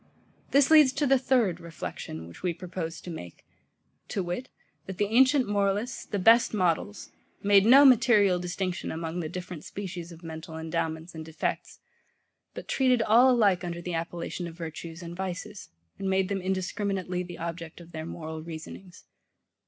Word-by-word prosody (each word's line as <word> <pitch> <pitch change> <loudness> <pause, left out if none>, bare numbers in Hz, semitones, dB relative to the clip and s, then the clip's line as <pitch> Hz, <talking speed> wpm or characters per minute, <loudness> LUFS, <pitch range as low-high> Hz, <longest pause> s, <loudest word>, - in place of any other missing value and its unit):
This 280 +2 +4
leads 305 -4 +8
to 295 - 0
the 270 -1 +4
THIRD 240 -9 +2
reflection, 150 - -7
which 85 - -13
we 180 -2 -1
proposed 170 -2 -6
to 175 - -7
make, 90 - -9 0.6
to 195 - -2
wit, 180 +9 -4 0.4
that 190 -1 -6
the 205 - +2
ancient 260 +5 +4
moralists, 205 +3 -1
the 205 - -2
best 225 +4 +5
models, 185 +2 -1 0.3
made 200 0 +5
no 275 +4 +9
material 220 -7 +5
distinction 180 +1 -3
among 165 +1 -4
the 160 -3 -3
different 180 -2 -7
species 180 -3 -7
of 170 +1 -13
mental 160 0 -7
endowments 160 +1 -3
and 160 -1 -7
defects, 160 0 -4 0.7
but - - -8
treated 255 -3 +2
all 235 +4 +6
alike 205 -8 +3
under 170 -1 -4
the 175 0 -5
appellation 170 +1 -4
of 165 0 -10
virtues 165 +1 -7
and 170 0 -7
vices, 190 +3 -6 0.3
and 195 - -2
made 190 0 +1
them 195 -1 -1
indiscriminately 185 0 -2
the 175 -1 -8
object 165 0 -6
of 170 0 -13
their 160 0 -6
moral 160 -1 -6
reasonings. 170 +3 -10
180 Hz, 165 wpm, -28 LUFS, 165-205 Hz, 0.7 s, no